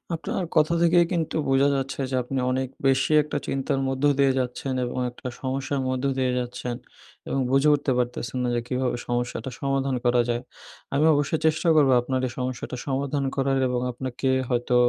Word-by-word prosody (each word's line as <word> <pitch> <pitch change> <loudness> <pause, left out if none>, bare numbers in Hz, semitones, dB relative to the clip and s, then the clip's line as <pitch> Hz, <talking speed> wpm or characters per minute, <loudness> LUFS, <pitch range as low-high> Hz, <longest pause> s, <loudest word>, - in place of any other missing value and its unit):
আপনার 170 +2 -3
কথা 155 +1 +4
থেকেই 170 0 +5
কিন্তু 165 -4 -1
বোঝা 135 +1 +4
যাচ্ছে 135 0 -3
যে, - - 0
আপনি 130 +2 -3
অনেক 130 0 0 0.2
বেশি 135 +2 +2
একটা 150 0 -3
চিন্তার 135 0 -1
মধ্য 135 +1 -3 0.2
দিয়ে 135 -1 +5
যাচ্ছেন 125 +1 -3
এবং 120 - -5
একটা 125 +1 -9
সমস্যার 135 +1 -2
মধ্য 130 +1 -2
দিয়ে 130 -1 +1
যাচ্ছেন, 125 0 -4 0.5
এবং 135 - -1
বুঝে 135 +3 +4
উঠতে 145 -1 -1
পারতেছেন 125 0 -2
না - - 0
যে 120 - 0
কীভাবে 125 -1 -1
সমস্যাটা 120 +2 -2
সমাধান 135 -1 0
করা 120 0 +4
যায়। 120 0 0 0.5
আমি 145 +3 +3
অবশ্যই 145 +2 +1
চেষ্টা 160 +2 +2
করবো 140 -4 +5
আপনার 130 +1 -1
এই - - -6
সমস্যাটা 125 0 -4
সমাধান 140 +1 -1
করার 135 0 +1
এবং 125 0 -1
আপনাকে 130 +1 -4 0.2
হয়তো 120 0 +1
135 Hz, 175 wpm, -25 LUFS, 125-140 Hz, 0.5 s, থেকেই